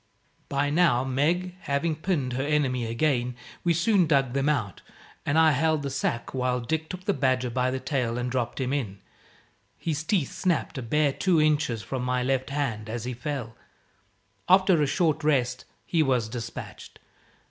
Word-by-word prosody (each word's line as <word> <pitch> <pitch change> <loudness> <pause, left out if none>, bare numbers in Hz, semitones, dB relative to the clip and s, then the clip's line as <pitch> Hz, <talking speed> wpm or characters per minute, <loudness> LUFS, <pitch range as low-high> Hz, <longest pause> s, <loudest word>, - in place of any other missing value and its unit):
But 145 +1 0
now, 150 -7 +4
Meg 160 +8 0
having 155 0 -1
pinned 150 -6 -1
her 130 +2 -1
enemy 135 -5 0
again, 125 0 0 0.3
we 170 -1 +2
soon 190 0 +3
dug 135 -5 +2
them 140 +2 +1
out: 115 -11 -1 0.5
and 145 +2 +2
I 160 -1 +6
held 155 +1 +1
the 140 - -3
sack 125 -3 -2
while 125 -1 0
Dick 160 +6 -2
took 185 0 -6
the 200 - +2
badger 130 -2 +1
by 125 +1 +1
the 130 +1 -2
tail 130 -3 -1
and 125 0 -2
dropped 125 -1 -2
him 130 0 -1
in. 110 -9 -2 0.8
His 160 -2 -2
teeth 170 -5 0
snapped, 175 -6 -1
a - - -4
bare 145 +4 +1
two 180 0 +2
inches 150 -7 +1
from 130 -2 -4
my 125 0 0
left 130 0 0
hand, 120 -7 -2
as 115 0 -4
he 125 +1 -3
fell. 125 -2 -5 0.9
After 185 -3 +5
a 145 - +2
short 155 0 +1
rest, 125 -5 +1 0.2
he 165 - +1
was 125 -6 +1
despatched. 115 0 -7
135 Hz, 175 wpm, -26 LUFS, 125-155 Hz, 0.9 s, I